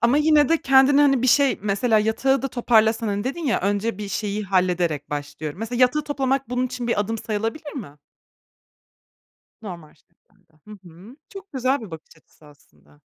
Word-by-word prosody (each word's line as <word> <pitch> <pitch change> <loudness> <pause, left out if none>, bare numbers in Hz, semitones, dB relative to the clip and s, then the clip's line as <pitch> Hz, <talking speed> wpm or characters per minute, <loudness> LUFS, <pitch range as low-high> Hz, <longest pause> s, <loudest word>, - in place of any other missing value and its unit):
Ama 235 +4 +3
yine 300 -2 +4
de 330 - +4
kendini 270 +1 +5
hani 275 -4 +3
bir - - +2
şey, 275 +2 +3
mesela 210 +3 +1
yatağı 245 +5 +1
da 270 - -2
toparlasan, 225 -2 +2
hani 205 +2 -2
dedin 310 +5 -4
ya 255 - +1
önce 205 +2 -1
bir 205 -1 -6
şeyi 205 0 -3
hallederek 180 -6 0
başlıyorum. 145 +2 -6
Mesela 235 +3 -4
yatağı 285 +4 +2
toplamak 270 -3 -1
bunun 250 +1 0
için 250 -1 -6
bir 220 - +1
adım 225 +2 -3
sayılabilir 225 +9 -4
mi? 180 - -8 1.7
Normal 170 -7 -9
şeklinde. 160 - -35 0.2
Hı - - -12 0.2
hı. 190 - -15
Çok 390 -3 -12
güzel 260 +1 0
bir 215 - -10
bakış 160 0 -12
açısı 160 -1 -23
aslında. 75 - -23
225 Hz, 175 wpm, -22 LUFS, 185-265 Hz, 1.7 s, kendini